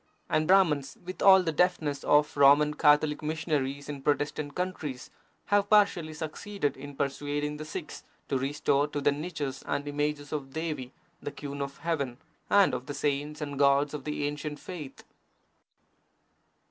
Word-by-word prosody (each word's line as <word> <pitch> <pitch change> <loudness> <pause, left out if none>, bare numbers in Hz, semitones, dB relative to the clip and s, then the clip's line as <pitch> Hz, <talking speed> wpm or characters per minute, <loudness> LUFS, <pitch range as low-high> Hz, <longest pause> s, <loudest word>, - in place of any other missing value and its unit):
And 155 0 +2
Brahmans, 155 -8 +3
with 185 +1 -7
all 190 -1 +8
the 165 - 0
deftness 155 -4 +1
of 150 0 +3
Roman 145 +1 +6
Catholic 150 0 +3
missionaries 150 -3 -2
in 145 -2 -6
Protestant 145 0 -1
countries, 155 -8 -4 0.3
have 205 0 +2
partially 180 -7 +3
succeeded 160 +2 -3
in 140 +1 -9
persuading 145 +2 -2
the 155 - -7
Sikhs 160 +1 -7 0.2
to 135 - 0
restore 140 +1 +1
to 145 - -4
their 145 0 +2
niches 145 -3 -4
the 140 - -3
images 145 0 -2
of 135 -3 -4
Devi, 155 -6 -4 0.3
the 145 - -5
Queen 140 0 -6
of 140 0 -5
Heaven, 140 -7 -2 0.3
and 200 -9 +5
of 125 0 -4
the 145 - -5
saints 145 +1 -2
and 145 -2 -4
gods 140 +1 +4
of 150 -3 -5
the 150 -1 -2
ancient 145 0 -4
faith. 155 -7 -8
145 Hz, 155 wpm, -29 LUFS, 140-155 Hz, 0.3 s, all